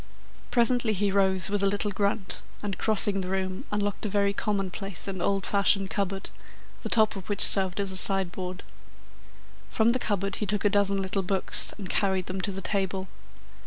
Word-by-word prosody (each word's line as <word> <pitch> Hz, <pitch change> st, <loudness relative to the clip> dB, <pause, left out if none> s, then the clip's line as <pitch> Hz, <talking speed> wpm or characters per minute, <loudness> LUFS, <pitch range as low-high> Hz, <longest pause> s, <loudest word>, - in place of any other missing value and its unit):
Presently 240 Hz, -2 st, +2 dB
he 200 Hz, 0 st, 0 dB
rose 190 Hz, -1 st, +2 dB
with 205 Hz, -1 st, 0 dB
a 200 Hz, -, +3 dB
little 205 Hz, +1 st, -1 dB
grunt, 200 Hz, 0 st, -1 dB, 0.2 s
and, 200 Hz, -3 st, -4 dB
crossing 205 Hz, -2 st, +3 dB
the 185 Hz, -, -5 dB
room, 190 Hz, 0 st, -3 dB
unlocked 205 Hz, -1 st, -2 dB
a 215 Hz, -, -1 dB
very 200 Hz, 0 st, +1 dB
commonplace 195 Hz, -2 st, -3 dB
and 190 Hz, -2 st, -4 dB
old 195 Hz, 0 st, 0 dB
fashioned 200 Hz, -1 st, +2 dB
cupboard, 195 Hz, -1 st, -3 dB, 0.5 s
the -, -, -5 dB
top 220 Hz, -2 st, +3 dB
of 195 Hz, 0 st, -9 dB
which 205 Hz, -, +4 dB
served 190 Hz, -1 st, +3 dB
as 200 Hz, -1 st, -1 dB
a -, -, -3 dB
sideboard. 185 Hz, -1 st, 0 dB, 1.1 s
From 225 Hz, 0 st, +2 dB
the 255 Hz, -, +1 dB
cupboard 195 Hz, -4 st, -1 dB
he 210 Hz, -, -3 dB
took 210 Hz, +1 st, 0 dB
a -, -, +5 dB
dozen 200 Hz, -1 st, +2 dB
little 195 Hz, +1 st, -1 dB
books 190 Hz, 0 st, +1 dB
and 200 Hz, -3 st, -7 dB
carried 190 Hz, -1 st, +1 dB
them 185 Hz, +1 st, -4 dB
to 200 Hz, -, -1 dB
the 195 Hz, 0 st, -6 dB
table. 190 Hz, -1 st, -2 dB
195 Hz, 185 wpm, -27 LUFS, 190-205 Hz, 1.1 s, a